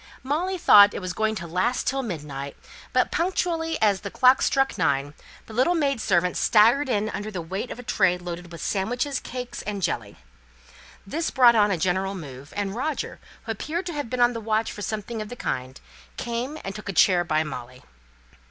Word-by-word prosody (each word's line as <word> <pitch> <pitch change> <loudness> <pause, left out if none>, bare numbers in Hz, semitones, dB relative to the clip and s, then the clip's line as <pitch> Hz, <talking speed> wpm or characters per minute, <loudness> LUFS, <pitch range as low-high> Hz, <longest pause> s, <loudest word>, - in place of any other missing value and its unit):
Molly 340 +8 -1
thought 205 - +7
it - - -2
was 185 -2 -4
going 220 +1 0
to 170 - -5
last 185 +9 0
till 270 +1 0
midnight; 145 - -6 0.3
but - - +2
punctually, 335 -2 0
as 200 -3 +3
the 200 - -5
clock 255 +5 +5
struck 270 0 +2
nine, 145 -6 0 0.3
the 220 - -12
little 260 +10 +3
maid 280 -7 0
servant 180 -2 +2
staggered 235 +6 +4
in 215 -2 0
under 205 +1 -4
the 195 -4 -5
weight 190 +8 -4
of - - -6
a 245 - -9
tray 185 -6 +2
loaded 175 -1 -7
with 170 -2 -7
sandwiches, 245 +7 -1
cakes, 250 0 -6
and 205 -2 -4
jelly. 105 -9 -2 0.9
This 320 +12 -2
brought 245 -3 +6
on 210 -2 +4
a 190 - +1
general 190 +3 0
move; 140 -5 -9
and 205 -1 -2
Roger, 290 +4 -3 0.2
who 225 - -4
appeared 320 - -3
to 345 - -4
have 290 -5 -4
been 255 - -3
on 240 0 +5
the 230 - -5
watch 220 0 0
for 205 - -8
something 215 +2 -4
of 210 - -6
the 245 - -7
kind, 130 - -4 0.4
came 245 +5 -3
and 195 - -5
took 215 0 -8
a - - -2
chair 180 -1 +4
by 155 -2 +1
Molly. 125 -4 -8
210 Hz, 200 wpm, -25 LUFS, 180-250 Hz, 0.9 s, thought